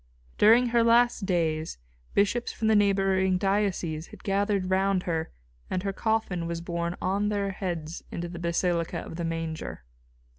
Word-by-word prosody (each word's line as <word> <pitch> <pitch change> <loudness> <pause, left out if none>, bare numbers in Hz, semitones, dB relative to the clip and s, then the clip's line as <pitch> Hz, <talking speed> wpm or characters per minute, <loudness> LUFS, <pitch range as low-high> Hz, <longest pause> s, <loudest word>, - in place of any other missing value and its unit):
During 235 +3 +6
her 235 0 +3
last 235 -3 +3
days 160 -3 0 0.4
bishops 205 +4 +2
from 220 - -1
the 220 - +5
neighbouring 195 -2 +3
dioceses 185 -5 0
had - - -14
gathered 195 -1 0
round 190 -1 +2
her 165 -2 -2 0.4
and 185 0 -2
her 195 -1 -2
coffin 215 -6 -1
was 170 0 -3
borne 170 0 -3
on 200 +3 0
their 200 -1 -1
heads 175 -4 -4
into 170 0 -4
the 170 0 -8
basilica 170 0 0
of 165 - -7
the 170 - -3
Manger. 165 - -4
190 Hz, 155 wpm, -27 LUFS, 170-205 Hz, 0.4 s, During